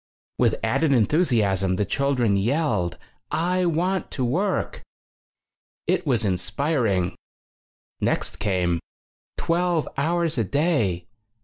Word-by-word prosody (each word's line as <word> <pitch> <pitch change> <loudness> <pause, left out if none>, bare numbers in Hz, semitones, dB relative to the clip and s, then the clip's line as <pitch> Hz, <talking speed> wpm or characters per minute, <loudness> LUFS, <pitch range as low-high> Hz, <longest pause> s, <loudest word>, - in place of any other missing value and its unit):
With - - +3
added 160 -3 +2
enthusaism, 105 - +2
the 105 - +1
chil 140 +7 0
dren 115 -5 +2
yelled: 105 - 0 0.3
"I 180 +3 +1
want 180 +4 0
to 130 - -1
work!" 180 +10 -1 1.0
It - - 0
was 120 -5 +1
inspiring. 100 - 0 0.9
Next - - -1
came: 90 -4 +1 0.6
"Twelve 170 -1 +1
hours 165 -1 0
a - - +3
day! 110 - 0
135 Hz, 105 wpm, -24 LUFS, 100-165 Hz, 1.0 s, With